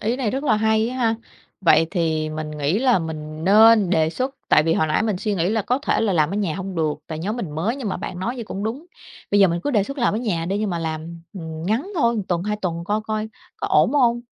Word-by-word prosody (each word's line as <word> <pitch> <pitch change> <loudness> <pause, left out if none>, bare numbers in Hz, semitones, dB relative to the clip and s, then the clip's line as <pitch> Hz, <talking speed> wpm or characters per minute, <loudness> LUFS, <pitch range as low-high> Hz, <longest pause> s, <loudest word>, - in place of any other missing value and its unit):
ý 230 +4 0
này 245 -6 -1
rất 270 +2 -3
là 220 -7 +3
hay 220 +1 +2
á 255 - -5
ha, 230 -3 +2 0.5
vậy 165 -2 +5
thì 160 -4 0
mình 155 0 -5
nghĩ 150 +6 0
là 250 -5 +3
mình 155 -1 -6
nên 215 0 +6
đề 160 -2 +2
xuất, 260 +7 -3
tại 155 - +5
vì 165 +1 +1
hồi 160 - +2
nãy 155 +7 +1
mình 215 -4 0
suy 210 +2 -2
nghĩ 175 0 0
là 220 -1 0
có 250 +6 0
thể 295 - 0
là 220 -4 +1
làm 155 -2 +2
ở 200 - -2
nhà 195 -7 -1
hông 190 0 -5
được, 155 -2 0
tại 155 -1 -5
nhóm 210 +8 -3
mình 190 -10 -4
mới, 180 - -2
nhưng 245 -7 -4
mà - - -2
bạn 180 - -6
nói 235 +7 -2
vậy 235 - -6
cũng 200 -1 -5
đúng, 265 +10 -4 0.4
bây 205 0 +4
giờ 195 - +7
mình 170 0 -1
cứ 290 - +1
đề 210 -6 +3
xuất 275 +3 -7
làm 235 -4 +2
ở - - 0
nhà 185 -9 -2
đi, 195 +2 -1
nhưng 210 -2 -1
mà 170 - -2
làm, 165 +1 -5
ừm, 160 -4 -7
ngắn 245 - -1
thôi, 235 -8 +2
một 210 - -1
tuần, 175 -1 0
2 210 +1 -2
tuần 170 -4 -3
coi 210 +3 0
coi 215 0 -2 0.3
có 410 - -3
ổn 385 -9 +3
hông 240 -4 +3
200 Hz, 285 wpm, -22 LUFS, 165-230 Hz, 0.5 s, giờ